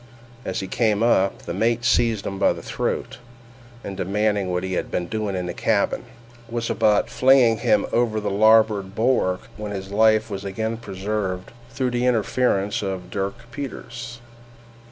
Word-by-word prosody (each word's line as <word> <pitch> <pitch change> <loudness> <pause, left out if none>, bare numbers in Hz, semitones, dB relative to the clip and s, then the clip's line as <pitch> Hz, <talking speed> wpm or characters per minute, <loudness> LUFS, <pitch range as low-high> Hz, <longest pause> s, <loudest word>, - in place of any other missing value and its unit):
As 95 - -2
he 95 - -5
came 110 -1 +1
up, 100 -5 +2
the - - -5
mate 120 +1 0
seized 115 -3 +2
him 95 0 -4
by - - +4
the - - -10
throat, - - -3 0.6
and 100 - -6
demanding 100 +1 0
what 90 0 -1
he 95 0 -3
had - - -2
been 90 - -2
doing 105 +1 -3
in 90 -1 -2
the 90 - -4
cabin, - - 0 0.4
was 115 0 -2
about 105 -2 +3
flinging 130 -4 +4
him 105 - +2
over 115 -2 +2
the 105 -1 -2
larboard 105 -2 +4
bulwark, 110 -6 +1 0.2
when 105 -1 -5
his 95 -1 -6
life 110 +1 +4
was 100 0 -4
again 110 +3 -3
preserved 95 -3 -4 0.2
through 125 +1 -2
the 120 +1 0
interference 110 -3 +1
of 95 -2 -4
Dirk 105 +4 -4
Peters. 120 -2 -7
105 Hz, 165 wpm, -23 LUFS, 95-115 Hz, 0.6 s, by